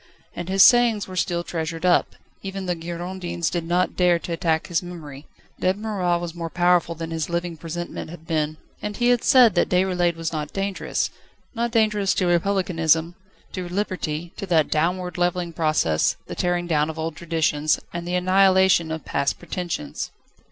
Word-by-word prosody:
And 175 +1 -5
his 195 +1 +6
sayings 240 -4 +5
were 185 - -8
still 175 -1 0
treasured 165 0 -4
up: 180 - +3 0.3
even 195 0 -5
the 180 - 0
Girondins 175 0 -4
did 175 -2 -2
not 180 +2 +1
dare 180 -1 +4
to 170 - -7
attack 165 -2 0
his 170 -3 0
memory. 155 -5 -9 0.3
Dead 185 +1 +1
Marat 195 -5 0
was 170 -1 -5
more 170 -1 -5
powerful 175 0 +2
than 165 0 -6
his 160 -1 -2
living 170 0 -2
presentment 165 +1 -6
had 165 -1 -11
been. 155 -2 -1 0.2
And 210 -1 -4
he 240 0 +2
had 245 -1 +3
said 250 -5 +6
that - - +2
Déroulède 180 -2 +2
was 165 0 -4
not 150 -1 -3
dangerous. 195 0 -2 0.4
Not 235 0 -1
dangerous 210 -4 +2
to 185 - +1
Republicanism, 170 -2 +2 0.4
to 180 -2 -5
liberty, 175 -4 -3
to 200 - -5
that 160 -5 +2
downward, 180 +3 0
levelling 175 -1 0
process, 155 - +1
the - - -7
tearing 175 0 0
down 155 -2 +1
of 160 - -6
old 160 0 -3
traditions, 155 -2 0
and 175 0 -5
the 180 - -1
annihilation 185 -2 +4
of 160 -1 -5
past 140 0 0
pretensions. 175 - -4
175 Hz, 175 wpm, -23 LUFS, 165-185 Hz, 0.4 s, his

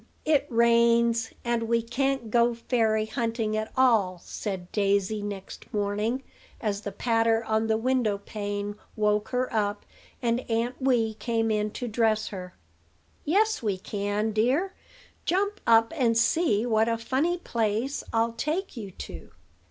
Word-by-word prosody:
it 295 -2 +3
rains; 235 0 +3
and 235 -1 +1
we 235 0 +3
can't 240 0 -1
go 235 0 +3
fairy 225 -2 +1
hunting 225 0 -1
at 215 0 -2
all," 215 -9 +3
said 190 -4 -5
Daisy 200 0 +1
next 200 -2 -7
morning, 210 +5 -1 0.4
as 205 -3 -2
the 205 - -5
patter 225 +2 +2
on 220 0 +1
the 220 0 +2
window 240 -3 +1
pane 205 0 -4 0.2
woke 210 0 +1
her 255 0 -1
up, 205 -2 -1 0.3
and 235 0 +1
Aunt 235 +3 -1
Wee 240 -4 +2
came 225 0 -1
in 210 0 +1
to 245 - -4
dress 220 -1 +1
her. 180 -2 -8 0.7
"Yes, 425 +6 +2
we 205 -4 -1
can, 205 +3 -2
dear; 260 - +1 0.5
jump 405 +4 0
up, 225 +3 +5
and 235 -6 +2
see 230 -2 +2
what 225 -1 +2
a 230 - +1
funny 275 +10 0
place 235 -2 -1
I'll 230 0 +1
take 310 +11 -2
you 215 -5 -6
to." 185 - -9
225 Hz, 145 wpm, -27 LUFS, 210-245 Hz, 0.7 s, up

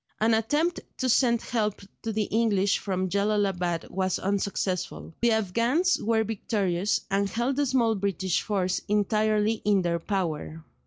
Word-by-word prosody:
An 225 +1 +3
attempt 295 +10 +1 0.2
to 260 - -1
send 235 -1 +3
help 215 -4 -1 0.2
to 225 - -3
the 215 0 0
English 205 -3 +1
from 185 -2 -2
Jellalabad 195 -4 0
was 185 -1 0
unsuccessful; 195 -3 -2
the 235 0 +4
Afghans 235 - +1
were 220 0 +2
victorious, 200 -3 -1
and 200 0 +1
held 240 +5 -1
the 290 -1 +2
small 240 -3 +2
British 195 -3 -1
force 190 -3 -1
entirely 215 +1 +1
in 200 -2 +3
their 170 -1 0
power. 165 -4 -3
210 Hz, 145 wpm, -27 LUFS, 190-225 Hz, 0.2 s, the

